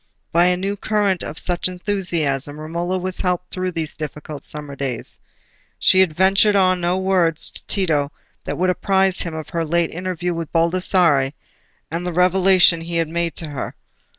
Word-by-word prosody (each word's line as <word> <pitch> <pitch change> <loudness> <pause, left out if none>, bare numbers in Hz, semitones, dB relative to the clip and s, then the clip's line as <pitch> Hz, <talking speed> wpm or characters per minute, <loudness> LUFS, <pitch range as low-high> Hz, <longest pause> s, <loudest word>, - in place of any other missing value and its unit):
By 170 +1 +4
a 180 0 +3
new 195 +2 -2
current 205 -2 0
of 150 - -6
such 175 0 -1
enthusiasm 170 -7 -1
Romola 170 +4 -3
was 185 0 -3
helped 180 -1 -1
through 185 -1 -2
these 160 -2 -3
difficult 150 -1 -7
summer 150 -2 -5
days. 130 -4 -3 0.6
She 185 - +4
had 180 -5 +3
ventured 195 +3 +4
on 185 -2 +3
no 175 +2 +1
words 185 -4 +1
to - - -12
Tito 155 -7 +1 0.3
that - - -4
would 185 +1 +2
apprise 190 0 +2
him 170 -2 -4
of 155 -1 -7
her 165 -1 -2
late 170 +1 0
interview 180 0 -3
with 165 -2 -5
Baldassarre, 165 -5 +2 0.6
and 165 +2 -3
the 180 -1 -3
revelation 180 -1 +4
he 170 +1 -5
had 165 -2 0
made 170 0 -1
to 160 - -3
her. 140 -3 -5
175 Hz, 175 wpm, -20 LUFS, 160-185 Hz, 0.6 s, By